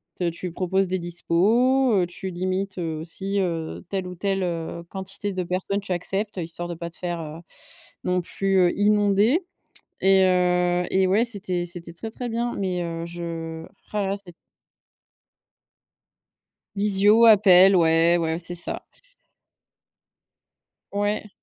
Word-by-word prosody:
t 175 -2 -1
tu 175 +2 -6
proposes 190 +2 0
des 185 - -1
dispos, 220 +10 +2
heu, 180 -3 +2
tu 185 +2 -6
limites, 185 +2 -3
heu, 165 -2 -2
aussi, 195 +5 -3
heu, 165 -3 -3
telle 190 -2 -3
ou 180 - -7
telle, 195 +2 -1
heu, 170 -1 -4
quantité 195 +1 -5
de 185 -1 -2
personnes 185 +3 -2
tu 200 -2 -7
acceptes 195 +3 -2
histoire 170 0 -5
de 175 - -4
pas 170 +1 -6
te 170 - -14
faire, 175 -2 -4
heu, 155 0 -8 0.6
non 180 0 +1
plus, 195 +2 -1
heu, 180 -2 +4
inondé 210 - +3 0.6
et 190 0 +5
heu 180 -1 +2
et 190 0 +3
ouais 205 +6 +3
c'était 190 -6 -3
c'était 170 -1 -8
très, 175 +7 -7
très 245 +2 -5
bien 235 +1 -2
mais 185 -3 -2
heu, 165 -1 -4
je 165 -1 -6 0.3
roh 210 - -1
là 200 - 0
là 195 - 0
c'est 200 -3 -11 2.4
Visio, 205 +2 +5
appel, 195 -3 +7
ouais, 165 +1 +4
ouais, 160 0 -1
c'est 175 0 -4
ça. 175 0 -3 2.1
Ouais. 205 +1 -1
185 Hz, 150 wpm, -24 LUFS, 175-200 Hz, 2.4 s, appel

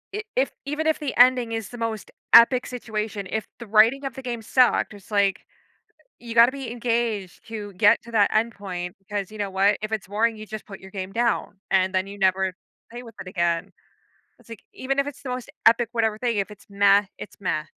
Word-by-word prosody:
I 425 - -2
if 265 +2 +1
even 300 +3 -2
if 315 - +2
the 290 -4 -4
ending 245 -1 +5
is 225 -2 -4
the 245 - -9
most 225 -2 -4 0.2
epic 245 +2 +7
situation, 215 -4 -4
if 220 0 -2
the 235 - -9
writing 225 +6 +4
of 270 - -4
the 265 - -7
game 240 -3 -4
sucked, 245 0 +2
it's 205 +2 -15
like, 200 -1 +2 0.8
you 235 -1 -7
gotta 235 +2 +7
be 270 -4 -6
engaged 230 -5 -2
to 210 -3 -7
get 205 +4 +4
to 235 - -12
that 210 -3 +3
end 225 +2 +1
point, 180 -3 -6
because 200 0 -5
you 215 - -10
know 205 -1 -2
what? 195 +2 +2
If 215 0 -4
it's 215 -4 -3
boring, 220 +3 +1
you 215 - -8
just 215 0 -8
put 195 -2 -10
your 190 - -13
game 190 -1 -5
down, 230 -3 -1
and 190 0 +2
then 185 +1 0
you 200 +1 -9
never 190 -1 +1 0.4
play 240 +1 -8
with 230 -2 -13
it - - -10
again. 170 0 -1 0.7
It's - - -23
like, 230 - -9
even 275 -7 -3
if 280 - +2
it's 285 0 -8
the 265 - -5
most 250 -1 -5 0.2
epic, 230 +1 +5
whatever 220 -2 0
thing, 235 -1 -1
if 200 0 -1
it's 210 -1 -14
"meh," 200 0 +4
it's - - -10
"meh." 155 -5 -1
220 Hz, 225 wpm, -24 LUFS, 200-240 Hz, 0.8 s, epic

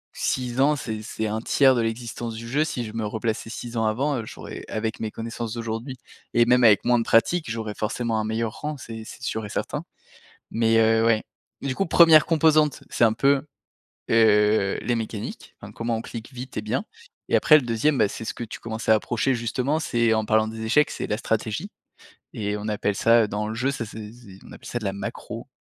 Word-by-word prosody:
6 125 0 -2
ans, 150 +2 +4
c'est 110 -6 -5
c'est 110 +1 -4
un 110 +1 -2
tiers 135 +1 +4
de 120 - +1
l'existence 115 0 -4
du 115 +1 -7
jeu. 145 +6 +1
Si 125 -6 -3
je 110 - -8
me 110 -2 -2
replaçais 110 +1 -3
6 120 0 -6
ans 110 - +1
avant, 135 +5 0
heu, 110 - -5
j'aurais - - -9
avec 110 0 -3
mes 110 - -2
connaissances 115 0 -5
d'aujourd'hui 115 +3 -5 0.4
et 120 0 +5
même 125 0 +4
avec 105 -2 +6
moins 120 -1 +4
de - - 0
pratique, 155 +5 +2
j'aurais 110 -2 -4
forcément 115 +1 -1
un - - -1
meilleur 110 0 -2
rang, 150 0 -3
c'est 115 -3 -8
c'est 125 - -11
sûr 110 -2 -3
et - - -7
certain. - - -3 0.7
Mais 115 0 +2
heu, 110 0 +4
ouais, 115 -1 +3 0.4
du 135 -2 -2
coup, 195 - 0
1re 165 -2 +7
composante, 155 -2 +3
c'est 120 - +3
un 110 - +4
peu, 140 +3 +3 0.7
heu, 105 -2 +4
les 120 - 0
mécaniques, 110 -2 -5
enfin - - -10
comment 115 0 -2
on 110 - -4
clique 115 +3 -8
vite 125 +1 -8
et 105 - -1
bien 125 - -2 0.4
et - - +3
après 155 - +5
le 150 - +2
2e, 120 +5 +1
bah, 100 - +4
c'est 115 - -7
ce - - -3
que - - -7
tu 110 - -8
commences 110 -1 -6
à 110 - +7
approcher 120 +4 0
justement, 125 +5 -1
c'est 115 -5 +1
en 110 -1 +1
parlant 110 0 +3
des 110 0 -7
échecs, 150 +7 +3
c'est - - -4
la 105 - -1
stratégie 110 -2 -2 0.6
et 105 -1 -2
on 105 - -6
appelle 105 -1 -1
ça 115 0 +4
dans 105 +1 -3
le - - -3
jeu, 130 +4 0
ça 120 -5 -4
c'est 105 -1 -9
c'est 105 -6 -14
on - - -13
appelle - - -13
ça 120 - -3
de 105 - -7
la 95 - -1
macro, 100 - -6
115 Hz, 225 wpm, -24 LUFS, 110-125 Hz, 0.7 s, 1re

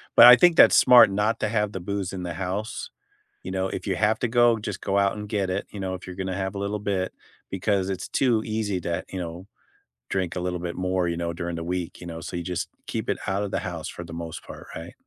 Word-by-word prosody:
But 115 - +10
I 125 +1 +12
think 170 +7 +5
that's - - +8
smart 125 -5 +8
not 105 +3 0
to - - +1
have 105 -1 0
the 95 - -4
booze 100 0 -3
in 90 -2 -5
the 85 - -4
house. 95 +5 -4 0.5
You - - -6
know, 95 0 -1
if - - -5
you 95 -2 0
have 110 +2 +2
to 120 - -1
go, 120 -1 +4
just 105 -2 -5
go 100 0 +1
out 100 +1 +2
and 105 0 -6
get 100 -3 -1
it, 95 +2 -2
you 100 - -8
know, 95 -1 -2
if 95 - -8
you're 90 - -8
gonna 95 -1 -3
have 95 0 -3
a - - -4
little 100 +1 -2
bit 95 -2 -1 0.4
because 95 0 0
it's 95 -2 -4
too 120 -5 +2
easy 110 -3 -1
to, 85 0 -2
you 95 - -6
know, 85 +1 -6 0.6
drink 95 -3 -1
a - - -2
little 90 0 -2
bit 85 0 -4
more, 90 -1 0
you 85 0 -2
know, 85 0 -2
during 85 +1 -4
the 85 - -4
week, 90 0 -4
you 85 - -8
know, 80 -1 -6
so - - -6
you - - -3
just 90 0 -3 0.2
keep - - -3
it - - +1
out 95 +1 0
of 100 - -4
the - - 0
house - - -5
for 85 - -7
the 85 -1 -10
most 85 -1 -6
part, - - -11
right? - - -8
95 Hz, 270 wpm, -25 LUFS, 90-105 Hz, 0.6 s, I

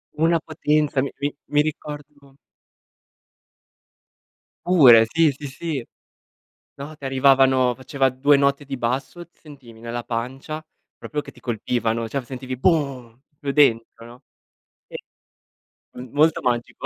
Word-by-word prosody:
una 165 +2 +2
potenza, 150 -3 0
mi 140 - -2
mi 145 +1 -2
mi 150 - +2
ricordo 145 -2 -8 2.3
Pure, 130 -11 +7
sì, 165 +4 +3
sì, 145 +2 -10
sì. 140 -2 -5 0.9
No, 145 +3 -9
ti 145 - -13
arrivavano 130 -1 +3
faceva 135 +1 0
2 140 +3 +3
note 140 +1 +1
di 135 -2 -6
basso, 130 +8 -3
sentivi 140 -9 -16
nella 120 +1 -5
pancia 135 +7 -5 0.3
proprio 150 -1 -5
che - - -11
ti - - -19
colpivano, 115 -1 -2
cioè 140 +4 -2
v - - -14
sentivi 130 0 -6
boom 130 -6 -1
proprio 145 -1 -6
dentro, 115 -5 +2
no. 120 +3 -15 0.7
E - - -7 1.0
m 125 0 -8
molto 155 +2 +3
magico. 120 -1 -2
135 Hz, 130 wpm, -22 LUFS, 125-150 Hz, 2.3 s, Pure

